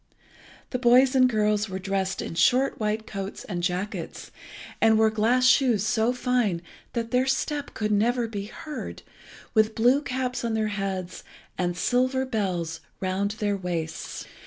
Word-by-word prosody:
The 250 - -1
boys 255 +2 +5
and 255 -1 +5
girls 210 -2 +1
were 190 - -3
dressed 190 0 -2
in - - -5
short 250 +11 +3
white 215 0 -1
coats 195 -1 -6
and 180 -4 -4
jackets, 180 +4 -3 0.5
and 220 -1 +5
wore 220 0 +4
glass 230 +4 +2
shoes 250 -5 +4
so 220 +2 +2
fine 245 -8 0 0.3
that 230 -1 -3
their 255 +1 +2
step 285 +2 -1
could 215 -1 -1
never 235 +3 +2
be 205 -3 -5
heard, 300 +7 -7 0.5
with 220 -1 +3
blue 245 +5 +4
caps 255 -2 -3
on 230 -1 -1
their 215 -1 0
heads, 195 -3 -4 0.3
and 175 -1 -1
silver 255 +5 +1
belts 180 -9 -2 0.2
round 190 +2 -1
their 205 -3 0
waists. 170 -4 -4
220 Hz, 155 wpm, -26 LUFS, 195-250 Hz, 0.5 s, boys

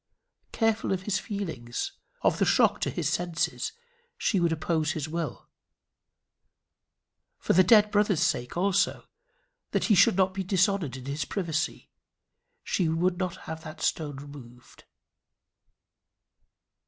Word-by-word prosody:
Careful 225 -2 +1
of 185 -1 -3
his 200 0 0
feelings, 160 - -4 0.3
of - - +2
the - - +3
shock - - +3
to - - 0
his - - -2
senses, 175 -2 -1 0.5
she 200 - +1
would 170 -1 +2
oppose 160 -1 0
his 155 -2 -3
will. 165 0 -4 1.9
For - - 0
the 185 - +6
dead 210 +2 +6
brother's 205 -4 +2
sake 125 +6 -1
also, 195 +2 +1 0.7
that - - +1
he 220 - +3
should 180 - +5
not 190 -1 +3
be 190 0 -3
dishonoured 185 - +1
in 130 - -10
his 140 +3 -2
privacy, 165 -4 -3 0.7
she 175 -4 0
would 175 +3 0
not 185 -2 -3
have 160 0 -6
had 155 -1 -8
that - - -14
stone 150 -3 -1
removed. 135 -3 -13
170 Hz, 135 wpm, -27 LUFS, 155-195 Hz, 1.9 s, the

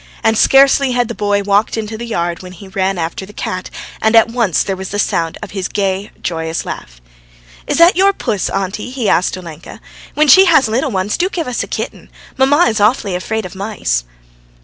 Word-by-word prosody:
And 225 - +3
scarcely 270 +2 +4
had 245 -1 0
the - - -3
boy 205 -2 0
walked 205 +3 +1
into 220 0 -4
the 235 +2 -6
yard 170 -5 -2
when 185 -1 -10
he 190 +2 -12
ran 190 0 -1
after 165 +3 -3
the 200 +2 -12
cat, 185 -2 -5 0.3
and 220 +1 +2
at 225 0 +6
once 230 -8 +1
there 195 - -2
was 190 0 -7
the 205 - -4
sound 165 -5 -1
of - - -8
his 190 -2 -3
gay, 195 0 -2
joyous 160 -1 -3
laugh. - - -8 0.7
"Is - - 0
that 335 +2 +6
your 390 +2 +4
puss, 220 - -2
auntie?" 195 +4 -3
he 250 -4 -3
asked 185 -1 +1
Olenka. 170 -3 -10 0.4
"When 305 +1 +3
she 375 +8 +8
has 315 -8 +4
little 240 +5 0
ones, 195 -1 -1
do 360 +2 +1
give 335 -6 -4
us 250 - -2
a - - -4
kitten. - - -6 0.3
Mamma 290 +6 +4
is 220 -1 0
awfully 210 -2 +2
afraid 215 +4 -3
of 180 - -8
mice." 190 - -2
210 Hz, 210 wpm, -16 LUFS, 185-245 Hz, 0.7 s, she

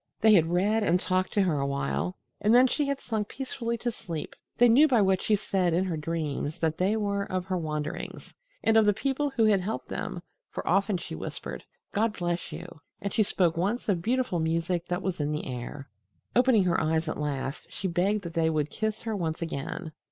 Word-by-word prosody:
They 220 -1 +6
had 165 -5 +5
read 200 +6 +2
and 180 -3 +3
talked 185 0 0
to 200 - +3
her 165 -6 +1
a 140 - 0
while, 140 +6 -2 0.2
and 215 +3 +4
then 250 +1 +8
she 285 +3 +1
had 280 -1 -1
sunk 215 -3 -2
peacefully 245 -3 -3
to 240 +1 -2
sleep. 165 -8 -6 0.2
They 245 - +7
knew 265 +7 +7
by 250 -6 +4
what 190 -1 +2
she 215 - +3
said 185 -4 +1
in 180 - +2
her 180 -3 -2
dreams 155 -1 -3
that 160 -1 -1
they 195 +4 +2
were 200 -1 -1
of 185 -1 -1
her 185 -1 -1
wanderings, 150 -2 -4 0.3
and 225 0 +4
of 220 -1 +5
the 205 - +4
people 275 +4 0
who 245 -5 +2
had 205 -3 +4
helped 210 +5 -4
them, - - -4 0.3
for - - -6
often 195 0 +2
she 175 - -7
whispered, 80 - -6 0.3
"God 220 +1 +1
bless 175 -1 -2
you." 165 0 -9 0.2
And 200 - -4
she - - +3
spoke 180 -4 +2
once 200 +8 -1
of 180 -4 +2
beautiful 245 -3 0
music 165 +2 0
that 180 +1 -2
was 185 -3 -2
in 145 0 0
the 150 - -2
air. 130 +2 -6 0.5
Opening 245 -4 +5
her 180 -2 +2
eyes 160 +1 +1
at 155 - -3
last, 140 -1 -3
she 190 - -3
begged 195 +4 +1
that 170 -2 -6
they 165 -1 +2
would 155 -2 0
kiss 220 -1 -2
her 225 -2 -2
once 165 -4 -2
again. 160 +2 -4
185 Hz, 220 wpm, -28 LUFS, 160-215 Hz, 0.5 s, then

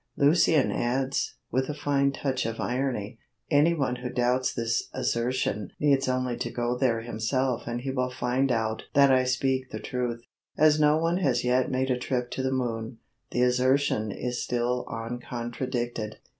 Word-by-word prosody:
Lucian 155 0 +4
adds, 130 +3 -1 0.2
with 130 +3 0
a 150 - -3
fine 140 -1 +1
touch 135 -2 -2
of 115 0 -5
irony, 120 -4 -2 0.3
"Anyone 145 -4 +3
who 125 0 -5
doubts 125 +1 +1
this 115 -1 -1
assertion 115 -4 -1
needs 140 -2 +3
only 130 -1 0
to - - -3
go 120 0 -1
there 125 -3 +1
himself 120 +2 -1
and 120 0 -3
he 135 +1 -3
will 125 -1 0
find 125 +2 0
out 110 -1 0
that 140 -1 +6
I 130 -1 +4
speak 130 0 0
the - - -5
truth." 120 -2 -3 0.3
As 155 0 +5
no 150 0 +5
one 165 +2 +1
has 130 -9 +1
yet 125 +1 +2
made 130 0 0
a 125 - 0
trip 125 -1 -2
to - - -3
the 130 0 0
moon, 115 -2 -2 0.3
the 125 - +1
assertion 125 -3 +2
is 125 +4 -3
still 125 +1 -1
uncontradicted. 120 -1 -4
125 Hz, 165 wpm, -27 LUFS, 120-135 Hz, 0.3 s, that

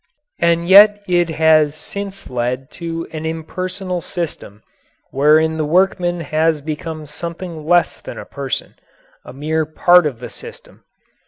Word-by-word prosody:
And 170 0 +2
yet 205 +2 +7
it 175 -2 +2
has 155 -2 +3
since 195 +5 -7
led 125 +2 -3
to 165 -1 -5
an 155 0 -6
impersonal 180 +3 -4
system 155 - -6 0.5
wherein 155 +3 +3
the 155 - 0
workman 175 +1 +1
has 160 0 +1
become 155 +1 -6
something 170 +1 -7
less 175 0 +2
than - - -9
a - - -8
person 140 -2 -5 0.5
a - - -11
mere 155 +4 -1
part 175 +1 +4
of 130 -6 -6
the 125 - -8
system. - - -13
160 Hz, 140 wpm, -18 LUFS, 150-175 Hz, 0.5 s, yet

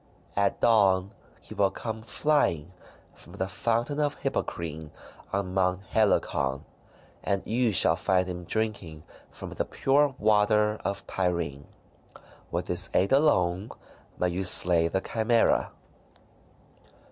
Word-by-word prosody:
At 100 -1 0
dawn 100 -4 +3 0.3
he - - -12
will 100 -1 +2
come 110 +2 -6
flying 110 - 0 0.4
from - - -14
the 95 - -3
Fountain 115 +8 -1
of 145 -1 0
Hippocrene 80 -2 -4 0.4
on 95 -2 -3
Mount 90 0 0
Helicon, 70 -10 0 0.6
and 100 -1 -1
you 120 +1 +1
shall 80 -4 +6
find 90 +1 +1
him 90 -1 -6
drinking 95 -8 -4 0.3
from - - -10
the - - -2
pure 140 0 +1
water 105 0 +2
of 100 0 -3
Pirene. 85 -7 -3 0.8
With - - -3
his - - 0
aid 95 - +2
alone 100 - +2 0.5
may 90 - 0
you 90 +2 -3
slay 85 -2 +5
the 95 +3 -2
Chimaera." 115 +1 +1
95 Hz, 125 wpm, -27 LUFS, 90-110 Hz, 0.8 s, shall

